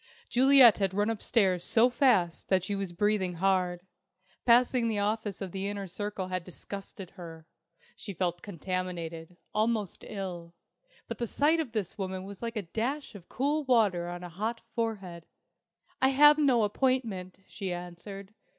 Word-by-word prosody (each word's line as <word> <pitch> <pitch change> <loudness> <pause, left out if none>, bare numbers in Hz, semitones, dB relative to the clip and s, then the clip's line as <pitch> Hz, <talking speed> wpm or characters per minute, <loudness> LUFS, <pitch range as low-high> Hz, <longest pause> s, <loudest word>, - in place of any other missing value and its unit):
Juliet 260 -3 +7
had 190 -1 0
run 205 +2 +1
upstairs 195 -5 +1
so 235 +6 +4
fast 220 -10 +2
that 185 -2 +3
she 205 - -3
was 195 -2 -3
breathing 190 0 0
hard. 180 -1 +1 0.7
Passing 245 0 +4
the 220 -2 -1
office 210 0 -2
of 190 -2 -4
the 195 +1 -3
Inner 200 -1 -4
Circle 195 0 -5
had 185 -1 -2
disgusted 195 +1 -9
her. 165 -4 -11 0.5
She 200 - -8
felt 175 0 -1
contaminated, 175 -2 -5 0.2
almost 215 -3 -1
ill; 175 -4 -6 0.5
but - - -6
the 235 - -1
sight 305 +8 +2
of 275 -8 -3
this 210 -3 -3
woman 190 -1 -3
was 195 0 -10
like 235 0 -4
a 215 - -2
dash 240 - -3
of 190 -4 -13
cool 290 +5 0
water 210 -9 +2
on 175 0 -6
a 175 - -7
hot 220 +7 -3
forehead. 195 -7 -4 0.7
"I 265 - +5
have 295 +3 +6
no 260 -6 +4
appointment," 210 -5 -1
she 190 -2 -5
answered. 180 +3 -8
200 Hz, 160 wpm, -29 LUFS, 180-230 Hz, 0.7 s, Juliet